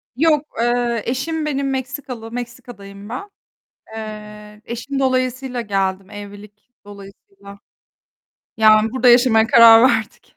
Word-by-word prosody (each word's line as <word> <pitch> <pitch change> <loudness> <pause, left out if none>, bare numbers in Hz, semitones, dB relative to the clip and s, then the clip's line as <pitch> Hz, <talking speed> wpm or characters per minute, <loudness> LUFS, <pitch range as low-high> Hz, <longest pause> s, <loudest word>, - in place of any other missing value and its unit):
Yok, 305 0 +2
eee, 240 -1 0
eşim 305 +6 -3
benim 275 -2 -2
Meksikalı. 260 -3 -6
Meksika'dayım 235 -5 -9
ben. 330 - -7 0.7
Eee, 210 -1 -10
eşim 270 +4 -5
dolayısıyla 255 -1 -1
geldim, 195 -2 -3
evlilik 205 +2 -12 0.2
dolayısıyla. 200 - -14 1.0
Yani 215 0 +4
burada 260 -1 +2
yaşamaya 240 -2 +4
karar 230 +1 +7
verdik. 220 -3 -4
235 Hz, 105 wpm, -19 LUFS, 210-260 Hz, 1.0 s, karar